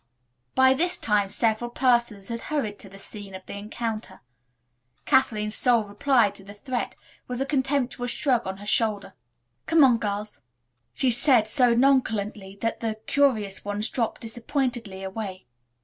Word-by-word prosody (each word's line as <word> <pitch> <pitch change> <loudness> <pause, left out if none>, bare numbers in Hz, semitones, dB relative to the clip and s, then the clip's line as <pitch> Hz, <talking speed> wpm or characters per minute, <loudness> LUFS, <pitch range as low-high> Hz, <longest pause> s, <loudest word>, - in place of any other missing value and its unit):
By 260 0 +6
this 350 +6 +1
time 205 -2 +1
several 225 +3 0
persons 240 -5 +1
had 230 0 -3
hurried 230 -9 -2
to 195 - -9
the 195 - -12
scene 200 -1 -8
of 185 - -10
the - - -8
encounter. 215 +2 -5 0.8
Kathleen's 210 -5 +2
sole 240 -2 +4
reply 215 +1 +2
to 195 - -14
the 200 +1 -11
threat 250 +3 -4 0.3
was 250 0 -4
a 270 - 0
contemptuous 270 -3 -1
shrug 245 -4 +1
of 190 0 -4
her 205 - -11
shoulders. 210 -1 0 0.6
"Come 325 -1 +5
on, 245 -4 +5
girls," 210 0 -4 0.5
she 260 -2 +3
said 245 -2 +4
so 245 0 +4
nonchalantly 215 -6 +1
that 230 0 -1
the 225 -2 -2
curious 220 -9 +1
ones 205 +2 -2
dropped 235 -4 -2
disappointedly 230 -4 -3
away. 190 -1 -6
225 Hz, 150 wpm, -25 LUFS, 205-255 Hz, 0.8 s, By